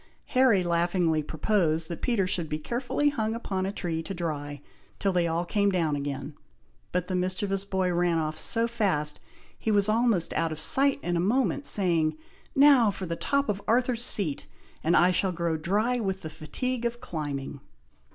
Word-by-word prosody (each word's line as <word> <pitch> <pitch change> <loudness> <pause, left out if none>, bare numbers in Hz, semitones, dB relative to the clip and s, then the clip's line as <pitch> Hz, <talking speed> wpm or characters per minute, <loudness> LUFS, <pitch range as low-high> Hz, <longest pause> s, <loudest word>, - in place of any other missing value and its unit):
Harry 255 -8 +4
laughingly 170 -2 +1
proposed 160 0 0
that 170 - -6
Peter 230 -6 +1
should 175 -4 -1
be 150 - -1
carefully 245 - -1
hung 225 -6 -2
upon 190 -5 -2
a - - -2
tree 170 -5 -3
to 195 +4 -6
dry, 145 -4 -4 0.4
till 195 -1 0
they 175 -1 +2
all 165 +1 -1
came 200 +2 +1
down 165 -6 +1
again; 145 +1 -4 0.6
but 180 -1 -1
the 185 - -2
mischievous 190 +2 -1
boy 190 -2 0
ran 175 -1 +1
off 155 -1 -1
so 230 +8 +1
fast, 185 -11 0 0.4
he - - -2
was 205 -1 +3
almost 220 -5 +1
out 165 -1 0
of 155 - -4
sight 275 - +3
in 175 - -1
a - - +1
moment, 255 +9 +1
saying, 165 -5 +1 0.4
"Now 270 -5 +6
for 195 -1 -4
the 170 -1 -3
top 280 +9 0
of 205 -1 -2
Arthur's 245 0 +2
Seat, 180 - 0 0.4
and 170 +2 +3
I 180 +1 +5
shall 185 +1 +1
grow 170 -1 -1
dry 210 +10 0
with 190 -3 -3
the 160 - -5
fatigue 240 - -4
of 235 0 -2
climbing." 145 - -5
185 Hz, 180 wpm, -27 LUFS, 160-220 Hz, 0.6 s, Now